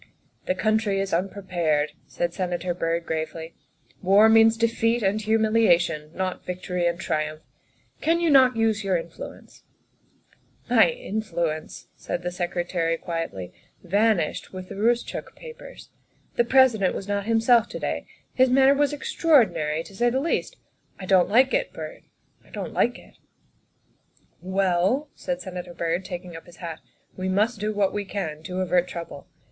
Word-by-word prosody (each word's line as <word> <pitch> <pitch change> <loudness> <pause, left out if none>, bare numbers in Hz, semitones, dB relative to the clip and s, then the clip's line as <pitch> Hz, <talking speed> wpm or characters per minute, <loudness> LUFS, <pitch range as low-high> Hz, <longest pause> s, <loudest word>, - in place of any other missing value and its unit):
" - - -40
The 185 - +1
country 215 0 +1
is 195 -2 -2
unprepared," 175 -5 0 0.2
said 170 -1 -2
Senator 180 -1 -2
Byrd 170 -1 -2
gravely; 160 +1 -4 0.3
" - - -40
war 200 +4 +6
means 225 0 +6
defeat 230 0 +1
and 200 +2 +1
humiliation, 215 -8 +2
not 185 -1 -3
vic 180 0 -6
tory 180 -1 0
and 170 0 -1
triumph. 155 -3 -2 0.6
Can 330 +2 +2
you 335 -2 +2
not 255 -3 +6
use 220 -2 +1
your 190 -2 +1
influence? 165 0 -10 0.3
' - - -36
' - - -39
" - - -34
My - - +6
influence," 170 - -4
said 175 - -5
the 180 - -2
Secretary 175 -2 -1
quietly, 165 - -5 0.2
" - - -37
van 220 0 +4
ished 155 -3 -3
with 185 -1 -8
the - - -6
Eoostchook 235 +4 -1
papers. 475 -1 -12 0.4
The 240 - +3
President 240 -7 +4
was 195 - -6
not 200 0 -2
himself 230 0 +4
to - - -6
day; - - -3 0.3
his 260 0 +4
manner 265 +2 +5
was 290 +1 +1
extraordinary, 215 - +2
to 195 - -14
say 240 +4 +2
the 260 +2 0
least. 335 - -2 0.4
I 190 - -6
don't 185 -1 +4
like 255 +4 +4
it, - - 0
Byrd; 155 -1 -8 0.4
I - - -23
don't - - -6
like - - +1
it." - - -19 0.7
" - - -39 0.2
Well," 195 +10 +2
said 270 0 -4
Senator 180 -2 -7
Byrd, 170 +2 -1
taking 180 -2 -7
up 165 - -11
his 175 - -14
hat, 165 -3 -7 0.2
" - - -39
we 185 0 -2
must 210 +4 +1
do 210 +1 -1
what 205 -2 +1
we 205 - -2
can 175 -6 -5
to 185 0 -3
avert 180 -1 +2
trouble. 170 -5 -8
190 Hz, 175 wpm, -25 LUFS, 170-225 Hz, 0.7 s, war